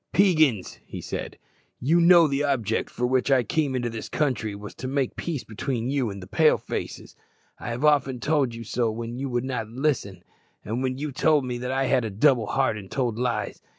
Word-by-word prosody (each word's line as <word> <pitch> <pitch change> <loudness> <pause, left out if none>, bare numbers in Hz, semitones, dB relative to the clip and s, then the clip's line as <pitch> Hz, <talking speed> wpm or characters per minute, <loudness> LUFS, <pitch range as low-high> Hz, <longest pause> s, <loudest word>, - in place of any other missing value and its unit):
"Peigans," 155 - +3
he - - -8
said, - - -5 0.4
"you 160 +7 +3
know 170 -1 +7
the 140 0 0
object 120 -6 0
for 125 - -2
which 130 +2 +1
I 130 -2 +4
came 140 +3 0
into 120 -1 -1
this 115 -1 -6
country 125 -8 -1
was 105 0 -9
to 130 - -3
make 135 -1 -1
peace 160 -6 -3
between 120 +2 -3
you 135 -5 0
and 100 -1 -7
the - - -10
Pale - - +4
faces. - - -6 0.4
I - - -5
have 120 +5 -2
often 140 -4 +3
told 140 -4 +1
you 115 - -7
so 115 +1 0
when 115 +2 -5
you 135 0 -3
would 120 0 -1
not 125 -5 -3
listen, 120 - -2 0.4
and 115 +5 -2
when 130 -1 -1
you 150 +1 -4
told 145 +1 +2
me 125 -1 -3
that 125 +1 -3
I 135 0 +1
had 130 -2 +2
a 110 - -2
double 115 +2 +3
heart 130 -4 +1
and 95 -2 -11
told 120 -4 -1
lies. 125 -1 -2
130 Hz, 215 wpm, -25 LUFS, 115-140 Hz, 0.4 s, know